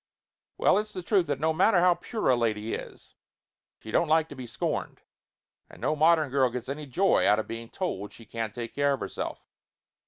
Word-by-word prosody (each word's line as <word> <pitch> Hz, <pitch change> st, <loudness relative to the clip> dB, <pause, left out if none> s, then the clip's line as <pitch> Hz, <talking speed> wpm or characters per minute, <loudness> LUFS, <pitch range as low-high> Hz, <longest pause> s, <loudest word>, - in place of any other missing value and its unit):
Well, -, -, +4 dB
it's 215 Hz, 0 st, -5 dB
the 185 Hz, -, -5 dB
truth 190 Hz, -2 st, +2 dB
that 145 Hz, -2 st, -1 dB
no 160 Hz, +1 st, +1 dB
matter 185 Hz, +3 st, +4 dB
how 180 Hz, 0 st, +5 dB
pure 220 Hz, +5 st, -3 dB
a -, -, +5 dB
lady 115 Hz, -2 st, -1 dB
is, -, -, -8 dB, 0.6 s
she 110 Hz, -, -10 dB
don't 170 Hz, -, +2 dB
like 160 Hz, +1 st, +3 dB
to 145 Hz, -, -9 dB
be 130 Hz, -2 st, -8 dB
scorned. 115 Hz, -, -3 dB, 0.7 s
And -, -, -14 dB
no 155 Hz, -, 0 dB
modern 155 Hz, -2 st, +4 dB
girl 135 Hz, -2 st, +3 dB
gets 125 Hz, +1 st, -6 dB
any 145 Hz, +1 st, -5 dB
joy 190 Hz, +10 st, +3 dB
out 105 Hz, -, +5 dB
of 110 Hz, -, -2 dB
being 115 Hz, 0 st, -7 dB
told 105 Hz, -, -4 dB
she 115 Hz, -, -14 dB
can't 110 Hz, -1 st, -5 dB
take 120 Hz, -1 st, -5 dB
care 140 Hz, 0 st, +2 dB
of 135 Hz, -, -3 dB
herself. -, -, -5 dB
140 Hz, 210 wpm, -27 LUFS, 115-170 Hz, 0.7 s, how